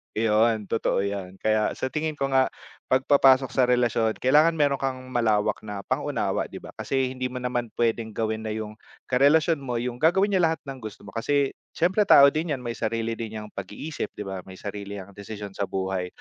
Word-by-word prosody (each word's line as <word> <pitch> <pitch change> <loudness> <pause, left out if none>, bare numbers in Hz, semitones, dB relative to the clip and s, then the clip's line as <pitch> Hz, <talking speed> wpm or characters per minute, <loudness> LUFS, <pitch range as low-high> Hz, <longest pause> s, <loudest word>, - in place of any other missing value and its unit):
Iyon, 110 0 +2
totoo 105 -3 +1
yun. 100 -2 -4
Kaya 110 0 +2
sa 130 - -3
tingin 155 0 -2
ko 135 -1 -2
nga 130 0 +4 0.4
'pag 130 0 +3
papasok 135 -2 +5
sa 130 - +3
relasyon 120 -3 +2
kailangan 150 +6 +4
meron 145 -2 +2
kang 135 -1 -1 0.2
malawak 110 -4 +1
na 100 -2 -6
pang-unawa, - - -1
di - - -13
ba? - - -10
Kasi 130 -1 -1
hindi 130 0 -3
mo 125 - -10
naman 125 -1 -2
puwedeng 115 -2 -1
gawin 110 0 -2
na 110 - -2
yung 110 0 -6 0.3
karelasyon 150 +5 +4
mo 130 -3 -4
yung 120 +1 -3
gagawin 190 +7 +3
niya 190 - +3
lahat 160 - -2
ng 135 -2 -8
gusto 110 -3 -9
mo, 100 - -11
kasi 140 +4 +1 0.2
siyempre 190 +5 +2
tao 140 -6 +9
din 155 +1 -1
yan, 125 - -10
may 120 - -3
sarili 115 0 -1
din 110 -1 -5
'yang 105 - -10
pag-iisip, 105 +11 -5
di - - -5
ba, 95 -1 -5
may 95 - -10
sarili 100 +1 -6
'yang 100 0 -9
desisyon 100 0 -8
sa 100 0 -3
buhay. 95 -1 -2
120 Hz, 205 wpm, -25 LUFS, 105-135 Hz, 0.4 s, tao